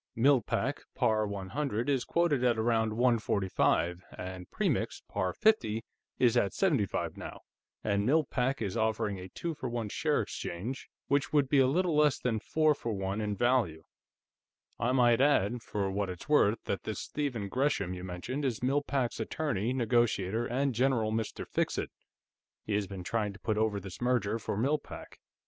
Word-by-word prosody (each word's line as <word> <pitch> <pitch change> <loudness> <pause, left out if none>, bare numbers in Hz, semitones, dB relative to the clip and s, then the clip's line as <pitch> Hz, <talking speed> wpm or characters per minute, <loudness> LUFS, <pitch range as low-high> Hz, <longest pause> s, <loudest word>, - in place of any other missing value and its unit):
Mill 130 +2 +5
Pack, - - -2
par 110 -1 +2
100, 110 +5 -2
is 135 -3 +1
quoted 165 -7 +1
at 120 -2 +3
around 110 -1 +1
145, 100 -6 +1
and 90 -1 -7
Premix, - - -1
par 95 -2 -1
50, 115 - +2 0.3
is 125 -2 +4
at 100 -5 +2
75 145 - 0
now, - - -8 0.4
and 100 -1 +1
Mill 155 +8 +3
Pack 130 -2 -1
is 95 -3 -3
offering 110 -3 0
a 90 +1 -8
two 170 - -4
for 130 -4 -5
one 115 -3 -3
share - - +1
exchange, 115 +10 -5 0.2
which 140 -1 +1
would 145 -2 +3
be 140 +1 +3
a 130 - +5
little 170 +4 +1
less 150 -2 +4
than 115 -3 -1
four 155 +6 +2
for 120 -5 -4
one 95 +1 -2
in 105 -1 -1
value. 110 -8 +1 1.0
I 120 +3 +1
might 120 -2 +4
add, 120 -5 +3
for 100 -3 -2
what 100 0 -1
it's 90 - -7
worth, 115 -8 +3
that 100 - -2
this 110 -3 -4
Stephen 125 -9 -3
Gresham 130 -5 0
you 90 0 -7
mentioned 95 +11 -4
is 125 -4 -1
Mill 135 +3 +2
Pack's 135 -5 -1
attorney, 120 -2 -1
negotiator, 120 -3 +1
and 135 +2 0
general 120 -2 +2
Mr. 110 0 -3
Fixit; - - -1 0.7
he 105 - -3
has 100 -1 0
been 95 -2 -7
trying 105 +1 -1
to 100 - -14
put 110 - -1
over 105 -1 +1
this 95 +1 -9
merger 120 -3 +1
for 100 - -3
Mill 140 +7 +2
Pack." - - -11
115 Hz, 175 wpm, -31 LUFS, 100-135 Hz, 1.0 s, Mill